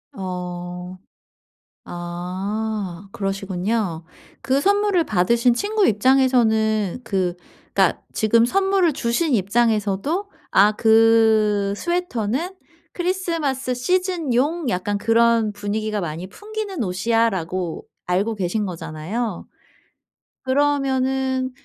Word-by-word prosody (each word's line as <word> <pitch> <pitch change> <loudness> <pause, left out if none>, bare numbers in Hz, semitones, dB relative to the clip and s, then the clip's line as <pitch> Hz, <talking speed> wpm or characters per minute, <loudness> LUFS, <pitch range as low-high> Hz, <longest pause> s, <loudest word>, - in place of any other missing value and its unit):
어. 180 -1 -6 0.9
아 185 +3 -4
그러시군요. 195 -3 -2 0.4
그 270 +1 +1
선물을 405 0 +2
받으신 235 - +2
친구 415 - +1
입장에서는 220 -3 +2
그 185 -3 -1 0.4
그러니까 - - +2
지금 230 +1 +3
선물을 385 +3 +2
주신 260 +4 0
입장에서도 225 - 0 0.2
'아 205 +2 +5
그 220 -2 +4
스웨터는 345 - -2 0.4
크리스마스 335 -8 -1
시즌용 325 -1 0
약간 200 +3 -1
그런 230 0 +3
분위기가 210 +1 -3
많이 170 0 -5
풍기는 415 - -5
옷이야.'라고 185 -4 -1 0.2
알고 195 +5 0
계신 200 +2 -1
거잖아요. 175 +5 -4 1.0
그러면은 265 -1 +1
225 Hz, 225 characters per minute, -22 LUFS, 195-265 Hz, 1.0 s, 아